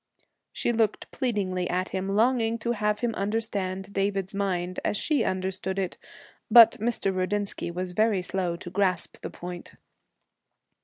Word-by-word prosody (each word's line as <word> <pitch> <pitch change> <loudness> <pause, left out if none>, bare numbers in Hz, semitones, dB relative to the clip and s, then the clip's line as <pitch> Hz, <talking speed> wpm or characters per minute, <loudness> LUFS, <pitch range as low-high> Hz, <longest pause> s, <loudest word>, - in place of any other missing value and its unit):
She - - -1
looked 225 -3 0
pleadingly 190 -7 -1
at 185 +1 -1
him, 190 0 -3
longing 230 0 +2
to 235 +1 -2
have 210 -2 0
him 235 -2 0
understand 200 -2 -2
David's 195 -1 -1
mind 185 -2 -1
as 210 - 0
she 290 -1 +1
understood 190 0 -2
it. 190 -2 -1 0.5
But 235 -2 +10
Mr. 210 -4 0
Rudinsky 195 0 -1
was 180 +1 -4
very 210 0 +2
slow 180 -2 -2
to 175 0 -9
grasp 185 -2 0
the - - -5
point. 175 0 -8
195 Hz, 145 wpm, -27 LUFS, 185-220 Hz, 0.5 s, But